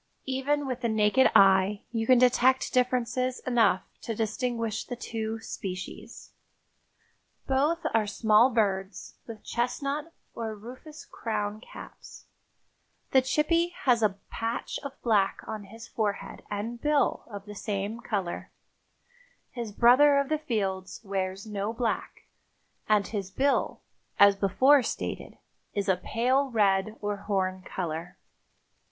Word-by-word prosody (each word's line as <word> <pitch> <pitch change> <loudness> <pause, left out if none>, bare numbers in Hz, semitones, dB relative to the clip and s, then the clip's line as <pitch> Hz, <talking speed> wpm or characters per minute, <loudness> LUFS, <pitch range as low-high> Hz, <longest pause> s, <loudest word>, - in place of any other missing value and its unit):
Even 275 +2 0
with 255 -2 -4
the 235 - 0
naked 220 +4 +4
eye 195 +1 +5
you 225 -1 -2
can 255 - +6
detect 255 +1 +3
differences 250 0 +1
enough 235 -7 +2 0.2
to 225 - -4
distinguish 225 0 -2
the 245 - -6
two 225 -1 -4
species. 190 -3 -7 1.1
Both 295 +6 +1
are 220 -2 +2
small 220 +3 +4
birds 195 -4 -1
with 225 -3 -9
chestnut 280 +6 -2 0.2
or 225 -2 -4
rufous 255 +8 -11
crown 210 -1 -4
caps; - - -12 0.9
the 265 - +6
chippy 335 +6 +1
has 245 -3 +4
a 205 -3 +1
patch 230 +1 -3
of 280 -1 -8
black 205 -4 +2
on 215 -2 -6
his 225 +4 -11
forehead 210 -3 -3
and 225 +3 -4
bill 295 -1 +1
of 200 -2 -8
the 210 - -9
same 205 +1 -3
color; 195 -7 -3 1.0
his 235 -4 -5
brother 255 +7 +6
of 280 -1 +1
the 310 -1 0
fields 195 -9 -3
wears 195 0 -3
no 210 0 -3
black, 230 -1 -3 0.7
and 210 -2 +4
his 200 -3 -4
bill, 275 +8 0 0.4
as 200 0 +7
before 230 +9 +4
stated, 235 - -5 0.4
is 200 -1 -1
a 190 - +4
pale 255 +9 0
red 205 -2 +2
or 205 -1 -2
horn 190 -2 -1
color. 175 -2 -5
225 Hz, 130 wpm, -28 LUFS, 200-255 Hz, 1.1 s, as